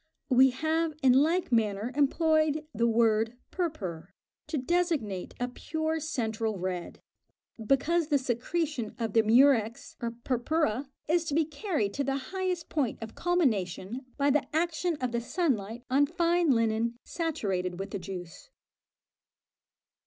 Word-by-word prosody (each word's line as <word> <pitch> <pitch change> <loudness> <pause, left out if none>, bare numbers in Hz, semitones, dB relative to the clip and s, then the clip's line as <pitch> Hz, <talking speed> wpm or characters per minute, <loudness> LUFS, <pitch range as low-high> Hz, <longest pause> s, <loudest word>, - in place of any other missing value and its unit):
We 260 +1 +7
have 315 +4 -1
in 255 -2 +6
like 320 +5 +2
manner 220 0 +1
employed 310 +2 +2
the 235 - +2
word 225 0 +2
"purpur" 195 - -3 0.4
to 315 - -2
designate 285 - -1
a 245 - 0
pure 315 +5 -2
central 225 -8 -2
red, 180 -1 -4 0.6
because 300 +8 +2
the 295 -2 +3
secretion 260 -1 -2
of 225 -4 -3
the 225 - +6
murex 230 0 +3
or 235 - -1
"purpura" 265 0 0 0.2
is 335 +2 +2
to 290 - -2
be 320 0 +3
carried 300 - -2
to 280 - -1
the 270 0 0 0.2
highest 370 -3 -2
point 280 -7 -1
of 225 0 -7
culmination 250 - 0
by 285 0 +3
the 295 0 +1
action 340 +1 0
of 255 -2 -1
the 235 0 -1
sun 325 +4 +1
light 220 +4 -8
on 275 +3 +3
fine 345 0 +2
linen 230 -1 +1
saturated 195 - -2
with 195 +1 -5
the 200 - -3
juice. 180 -2 -8
260 Hz, 140 wpm, -29 LUFS, 220-315 Hz, 0.6 s, We